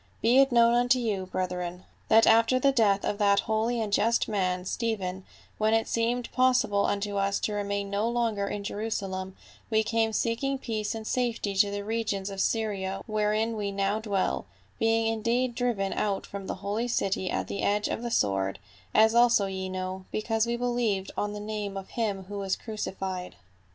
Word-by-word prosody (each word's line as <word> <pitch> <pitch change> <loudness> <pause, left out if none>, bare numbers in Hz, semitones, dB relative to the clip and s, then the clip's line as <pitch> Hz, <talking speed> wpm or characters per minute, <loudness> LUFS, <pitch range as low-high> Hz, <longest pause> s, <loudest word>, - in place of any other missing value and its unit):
" - - -34
Be 240 +4 +5
it 270 0 +5
known 235 -1 +5
unto 245 +1 +4
you, 205 -6 -2
brethren, 180 -1 -3 0.2
that 225 +1 +6
after 230 +3 +5
the 275 +2 +3
death 210 -6 +2
of 205 - -2
that 200 -1 +4
holy 220 +2 0
and 215 -2 -2
just 230 +3 +2
man, 185 -3 -1
Stephen, 190 -4 -2 0.3
when 215 +1 +3
it 225 - +1
seemed 235 +1 -1
possible 250 -6 +3
unto 205 0 -1
us 200 0 +1
to 210 - -1
remain 200 -1 -2
no 205 +3 0
longer 230 -4 0
in 205 0 -4
Jeru 210 +2 -3
salem, 190 -3 -3 0.3
we 220 -1 +3
came 225 0 +1
seeking 240 +5 0
peace 220 -3 -3
and 220 -1 -6
safety 235 -4 -1
to 200 +1 +5
the 200 0 -4
regions 205 -3 -2
of 195 -1 -3
Syria 195 -4 -1
wherein 215 +1 0
we 205 -2 -2
now 195 +2 0
dwell; 200 - -1 0.3
being 225 0 +2
indeed 230 +3 0
driven 235 -5 -1
out 200 -2 -1
from 195 -1 -7
the - - -3
holy 215 +4 -1
city 195 -5 0
at - - -2
the - - -4
edge 205 +1 +1
of - - -3
the 240 - -3
sword, 95 - +1 0.4
as 220 +1 +6
also 235 -3 +5
ye 190 -1 -4
know, 185 0 -4
because 225 +1 0
we 235 0 -1
believed 235 -6 -1
on 205 0 -2
the 210 - -5
name 210 -2 -4
of 195 - -7
him 205 -5 -2
who 200 +2 -6
was 195 -1 0
crucified. 190 -4 -5
210 Hz, 190 wpm, -28 LUFS, 195-230 Hz, 0.4 s, that